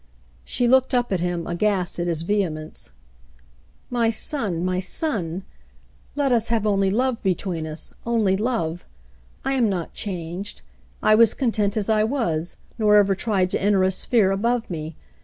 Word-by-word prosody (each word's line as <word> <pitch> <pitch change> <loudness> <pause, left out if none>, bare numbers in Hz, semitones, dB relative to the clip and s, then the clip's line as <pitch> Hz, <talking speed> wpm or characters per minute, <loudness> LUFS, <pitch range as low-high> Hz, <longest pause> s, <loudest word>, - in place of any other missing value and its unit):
She 245 - 0
looked 260 +1 +4
up 245 -2 +1
at 190 - +1
him, 175 -1 -2
aghast 180 0 -1
at 175 - -1
his 165 -2 0
vehemence. 165 - -2 1.0
'*My 235 -2 +2
son, 215 - -1
my 185 0 0
son! 185 - -2 0.7
Let 285 -2 +1
us 230 -2 +2
have 225 -2 0
only 195 -2 +2
love 245 +3 0
between 180 -4 -1
us 155 +1 -6
— - - -32
only 205 -5 +3
love. 190 -6 -2 0.6
I 270 - +1
am 245 -5 +2
not 180 -4 -3
changed. 180 0 -5 0.4
I 215 - +5
was 225 0 +5
content 215 -5 0
as 205 - 0
I 215 -1 +3
was, 195 - -1 0.2
nor 210 -1 +4
ever 200 -1 +4
tried 190 0 0
to - - -1
enter 200 -1 +3
a 190 - +3
sphere 195 +1 +2
above 230 +3 0
me. 155 -1 -5
200 Hz, 165 wpm, -23 LUFS, 175-230 Hz, 1.0 s, I